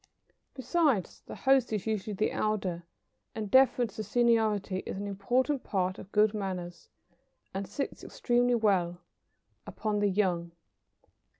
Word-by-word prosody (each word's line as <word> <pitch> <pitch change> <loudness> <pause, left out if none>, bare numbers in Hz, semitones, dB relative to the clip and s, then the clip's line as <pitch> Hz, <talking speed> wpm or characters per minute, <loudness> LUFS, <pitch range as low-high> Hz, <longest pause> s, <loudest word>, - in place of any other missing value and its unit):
Besides, 265 - 0
the - - -7
host 265 -3 +3
is 210 -4 -2
usually 215 -1 -2
the 215 - 0
elder, 190 -5 -2 0.5
and 215 -3 -4
deference 250 -4 +4
to 215 - -3
seniority 215 -3 +2
is - - -6
an 200 - -4
important 245 +8 0
part 185 -2 -1
of 190 - -11
good 210 0 +3
manners, 180 -4 -5 0.6
and 195 0 -4
sits 275 +9 -5
extremely 245 0 +1
well 185 -6 +1 0.7
upon 210 -1 -2
the 205 0 +2
young. 180 -4 0
210 Hz, 130 wpm, -30 LUFS, 190-240 Hz, 0.7 s, deference